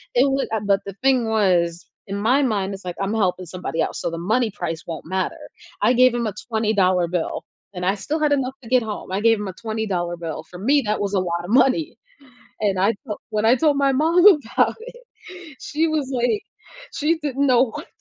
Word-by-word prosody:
It - - +5
wa 270 0 +1
uh, 220 - -1
but 200 0 +2
the 200 - -6
thing 260 -4 +3
was, 180 -6 +1 0.2
in 200 +1 -4
my 250 +7 +3
mind, 200 -6 -1
it's 195 -1 -10
like, 180 -1 -4
"I'm 195 +2 -1
helping 185 0 -2
somebody 165 -2 -4
else," - - -2
so - - -1
the 165 - -5 0.2
money 245 -3 +1
price 165 -4 -4
won't 165 -2 -6
matter. 185 - -2 0.4
I 220 +4 +4
gave 255 0 +5
him 235 -2 -1
a 210 - -3 0.2
$20 200 -6 +2
bill 175 -1 -3 0.3
and 180 0 -4
I 195 +2 +2
still 295 +11 -3
had 300 -1 +2
enough 265 -2 -1
to 230 - -11
get 255 -1 +3
home, 210 -4 -6
I 195 +2 -1
gave 225 -1 +4
him 210 - -4
a 185 - -7
$20 200 -6 -2
bill; 160 -2 -5
for 180 - -10
me, 280 +7 +3
that 210 0 -1
was 200 0 -2
a - - +3
lot 170 0 -2
of - - -9
money. 270 +5 +2 0.6
And 200 -3 +1
I 205 +4 +3
felt 210 - -5
when 215 0 -1
I 235 - +6
told 295 0 +2
my 275 -1 +3
mom 325 +6 +3
about 235 -6 0 0.2
it, - - -17 0.6
she 315 +2 -1
was 300 -4 -1
like, 405 - +1 0.5
she 320 +3 +1
didn't 280 -2 -1
know 255 -2 +5
what - - -8
220 Hz, 225 wpm, -22 LUFS, 190-265 Hz, 0.6 s, I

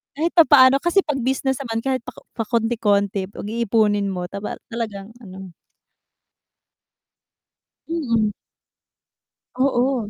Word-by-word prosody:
kahit 325 +4 -1
papaano 275 -5 +7
kasi 345 +3 +3
'pag 295 -3 -2
business 265 +1 -1
naman 225 -3 -3
kahit 265 -2 -1
pa 250 - -8 0.3
pakonti-konti 215 -4 0
'pag 205 - -8
iipunin 215 -3 +1
mo 180 -1 -4
taba 200 +2 -5 0.2
talagang 215 -3 -5
ano 190 -2 -10 2.4
Mm. 230 -10 0 1.2
Oo. 255 -3 0
230 Hz, 100 wpm, -21 LUFS, 205-265 Hz, 2.4 s, papaano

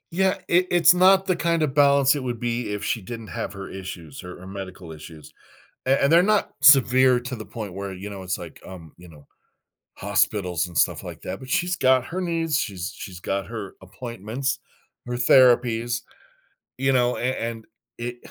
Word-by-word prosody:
Yeah, 190 +1 +2
it 180 +1 +3
it's 175 -1 +6
not 190 +1 +5
the 185 -2 +1
kind 170 -1 0
of 140 -3 -1
balance 140 -1 +4
it 145 - -3
would 120 -2 -4
be 120 -1 -2
if 105 0 -4
she 115 - -1
didn't 115 +2 -8
have - - -4
her 100 0 -8
issues, 90 -6 -8
her, 90 -1 -10
eh, - - -10
medical 95 -3 -8
issues. 80 0 -12 0.5
A 135 +1 +3
and 140 - +3
they're 170 +2 +6
not 210 +1 +1
severe 130 -2 +6
to 125 +1 -6
the 110 - -8
point 105 -5 -7
where, 100 0 -5
you 95 +2 -7
know, 100 -2 -8
it's 90 -1 -3
like, - - -10
um, 85 -4 -11
you 90 - -15
know, 75 -3 -17 0.7
hospitals 90 -5 0
and 85 -2 -12
stuff - - +1
like - - -9
that, - - -5
but 130 - -11
she's 175 +6 0
got 130 -3 +3
her 185 +3 -4
needs, 165 -4 -1
she's 95 - -4
she's 90 -4 -9
got 95 +1 -2
her 110 -4 -7
appointments, 120 +6 -4 0.5
her 120 - -4
therapies, 120 -1 +4 0.8
you 135 +1 +1
know, 125 -1 +2
an 125 +2 -1
and 115 -1 -5 0.3
it 120 +1 -5
120 Hz, 195 wpm, -24 LUFS, 95-140 Hz, 0.8 s, it's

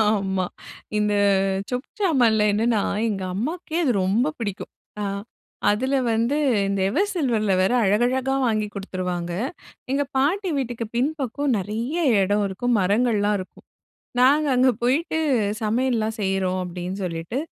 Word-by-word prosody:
ஆமா. 190 -3 0 0.5
இந்த 210 0 +1 0.6
சொப்பு 250 0 -3
சாமான்ல 245 - +3
என்னன்னா, 220 0 +2 0.3
எங்க 195 -3 -2
அம்மாவுக்கே 315 - -3
அது 255 - +3
ரொம்ப 235 +10 +2
பிடிக்கும். 210 -3 -5 0.3
அ - - -1 0.7
அதில 260 +7 0 0.2
வந்து 230 +6 +1 0.3
இந்த 200 -1 -1
எவர் 370 - +1
சில்வர்ல 235 - +1
வேற 190 +6 +2
அழகழகா 245 +6 +2
வாங்கிக் 215 -2 -1
கொடுத்துருவாங்க. 180 -3 -4 0.6
எங்க 280 +1 +2
பாட்டி 360 +8 +1
வீட்டிக்கு 240 -3 -3
பின்பக்கம் 280 0 0
நிறைய 220 - -3 0.3
இடம் 205 +2 +1
இருக்கும். 240 +6 -1
மரங்கள் 215 +4 +2
எல்லாம் 205 0 +2
இருக்கும். 185 - -11 0.6
நாங்க 285 +4 +5
அங்க 255 +1 +5
போயிட்டு, 305 +6 +1 0.4
"சமையல் 240 +4 +1
எல்லாம் 220 0 -1
செய்றோம்." 190 -2 0
அப்பிடின்னு 180 +2 -5
சொல்லிட்டு, 170 +7 -3
225 Hz, 130 wpm, -23 LUFS, 195-260 Hz, 0.7 s, நாங்க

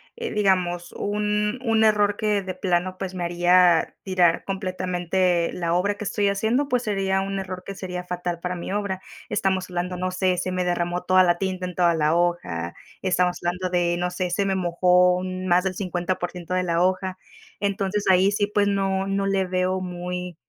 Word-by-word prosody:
eh, 470 0 -4
digamos, 180 -4 +1
un 210 +3 -1
un 225 -2 +3
error 205 -1 +3
que 210 -2 +1
de 185 -1 -5
plano, 185 0 -1
pues, 190 -1 -5
me 180 -1 -4
haría 175 0 +4
tirar 180 -3 +2
completamente 185 -2 0
la 170 -1 -1
obra 200 +3 +1
que 215 - -7
estoy 205 0 0
haciendo, 225 +8 +1
pues, 250 -2 +1
sería 195 -3 0
un 195 0 -3
error 185 -1 -5
que 195 - -7
sería 180 -1 -5
fatal 175 -1 -4
para 180 +1 -3
mi 175 +2 -5
obra. 200 -2 -2 0.3
Estamos 190 -1 0
hablando, 180 0 -3
no 185 +1 -2
sé, 185 0 0
se 185 - -2
me 180 0 -1
derramó 175 0 -1
toda 185 0 +5
la 175 -1 +3
tinta 185 -1 -2
en 180 - -8
toda 175 -1 +3
la 155 0 +2
hoja, 90 - -1 0.3
estamos 180 -1 +1
hablando 180 +1 -1
de, 175 -1 +1
no 180 0 0
sé, 180 0 -3
se 195 +2 +1
me 195 - +1
mojó 180 0 +3
un 185 0 -4
más 180 +1 +3
del 185 - -1
50% 180 -1 -3
de 185 - +1
la 170 -1 +1
hoja. 185 0 0 0.4
Entonces, 200 0 -1
ahí 190 +2 +5
sí, 205 0 +1
pues, 205 0 +1
no 195 -1 0
no 195 0 -1
le 195 -1 +1
veo 185 +1 0
muy 180 0 -5
185 Hz, 195 wpm, -24 LUFS, 180-195 Hz, 0.4 s, toda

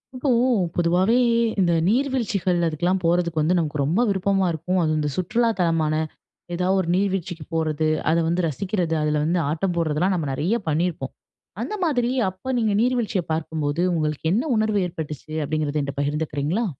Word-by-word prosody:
இப்போ 265 +2 -1 0.5
பொதுவாவே 180 +6 +3 0.4
இந்த 175 -2 +3 0.2
நீர்வீழ்ச்சிகள், 230 -8 0
அதுக்குலாம் 175 +4 0
போறதுக்கு 170 -1 +1
வந்து 170 +4 +2
நமக்கு 150 -3 -1
ரொம்ப 170 - +1
விருப்பமா 195 0 +1
இருக்கும். 175 +4 -1
அதுவும் 155 -1 +1
இந்த 150 -1 0
சுற்றுலா 230 +6 +1
தலமான 165 -3 +1 0.6
ஏதாவது 185 +2 +1
ஒரு 175 - -3
நீர்வீழ்ச்சிக்குப் 185 -5 -2
போறது, 155 -1 0 0.2
அத 165 - +3
வந்து 175 +1 0
ரசிக்கிறது, 175 +2 -1
அதுல 150 0 +1
வந்து 170 +3 +1
ஆட்டம் 175 +4 -1
போட்றதெல்லாம் 170 +3 +1
நம்ம 160 -5 -2
நெறைய 175 - 0
பண்ணியிருப்போம். 165 +2 -1 0.5
அந்த - - -4
மாதிரி, 250 -7 +1 0.2
அப்ப 225 +8 -6
நீங்க 220 -3 +1
நீர்வீழ்ச்சிய 240 -6 0
பார்க்கும்போது 155 0 -2
உங்களுக்கு 155 -2 -2
என்ன 235 +7 +1
உணர்வு 215 -1 +1
ஏற்பட்டுச்சு? 155 -3 -7
அப்படிங்கிறது 150 0 -1
என்கிட்ட 140 0 -3
பகிர்ந்துக்கிறீங்களா? 150 +7 -1
170 Hz, 150 wpm, -23 LUFS, 155-195 Hz, 0.6 s, பொதுவாவே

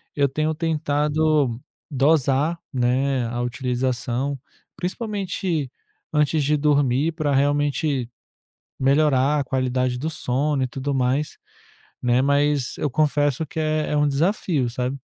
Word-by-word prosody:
eu 140 -1 +3
tenho 155 +3 -1
tentado 150 -4 +1 0.3
dosar, 145 +2 +2
né, 130 +1 +1
a 120 +1 -4
utilização, 125 +1 -2 0.4
principalmente 185 - -3 0.4
antes 150 0 +2
de 150 +2 +2
dormir 145 +1 +2
pra 155 -3 -1
realmente 145 -1 +1 0.7
melhorar 140 +1 +3
a - - 0
qualidade 130 -1 -1
do 155 - -2
sono 145 -1 -1
e - - 0
tudo 135 +3 -3
mais, 135 +3 0 0.6
né, 125 0 +2
mas 140 -1 +1
eu 150 - 0
confesso 145 +1 +1
que 155 - -6
é 155 -1 0
é 150 - +1
um 145 0 +3
desafio, 150 - 0
sabe? 125 +3 -2
145 Hz, 125 wpm, -23 LUFS, 130-155 Hz, 0.7 s, eu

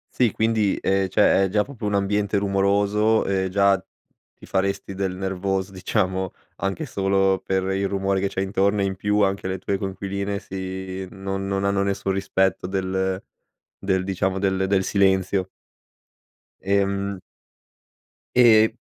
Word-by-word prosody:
Sì 120 -5 +3
quindi, 110 -2 +1
ehm, 95 0 +1
cioè, 95 +1 +4
è - - -2
già 105 +2 +2
proprio 125 -5 -8
un 105 - 0
ambiente 100 +1 +1
rumoroso 100 +2 +2
e 95 -1 0
già 100 0 +3 0.5
ti - - -14
faresti 100 0 -1
del 95 -1 -2
nervoso, 95 0 -2
diciamo, 95 -1 -1 0.2
anche 100 +11 -2
solo 95 -4 +1
per 95 -1 0
il 100 0 0
rumore 95 0 0
che 100 - 0
c'hai 95 - -2
intorno, 100 +1 +1
e - - +2
in 95 -1 -2
più 105 +2 +1
anche 100 -1 0
le 95 0 -2
tue 95 +1 -2
coinquiline 100 +1 -3
si 95 -1 -6
non 95 0 -4
non 100 0 -1
hanno 100 0 +1
nessun 100 0 -1
rispetto 95 -1 0
del 95 0 -1 0.6
del, 95 -1 0
diciamo, 95 0 -1
del 95 -1 +1
del 95 0 +2
silenzio. 95 -1 +1 1.1
Ehm 100 0 0 1.2
E 110 -2 +6
95 Hz, 145 wpm, -23 LUFS, 95-100 Hz, 1.2 s, E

